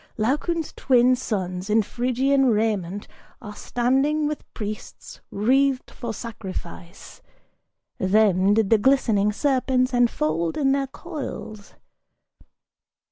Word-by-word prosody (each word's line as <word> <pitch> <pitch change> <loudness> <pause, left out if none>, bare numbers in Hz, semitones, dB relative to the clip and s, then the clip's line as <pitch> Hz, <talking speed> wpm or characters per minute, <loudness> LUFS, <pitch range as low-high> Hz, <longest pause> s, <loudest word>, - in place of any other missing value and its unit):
Laocoon's 300 +8 -1
twin 255 -1 +3
sons 190 -5 -4
in 215 +1 +3
Phrygian 260 +5 +1
raiment 210 -4 -1 0.3
are 210 -4 -9
standing 270 +8 0
With 300 0 -5
priests 210 0 -7
wreathed 265 +5 +1
for 235 -2 -6
sacrifice. 190 - -8 0.8
Them 195 0 +3
did 220 -2 +1
the 225 - +5
glistening 220 -5 +2
serpents 255 +1 +1
Enfold 165 -9 +1
in 275 -3 +2
their 275 0 0
coils! 265 - -8
235 Hz, 100 wpm, -23 LUFS, 205-270 Hz, 0.8 s, the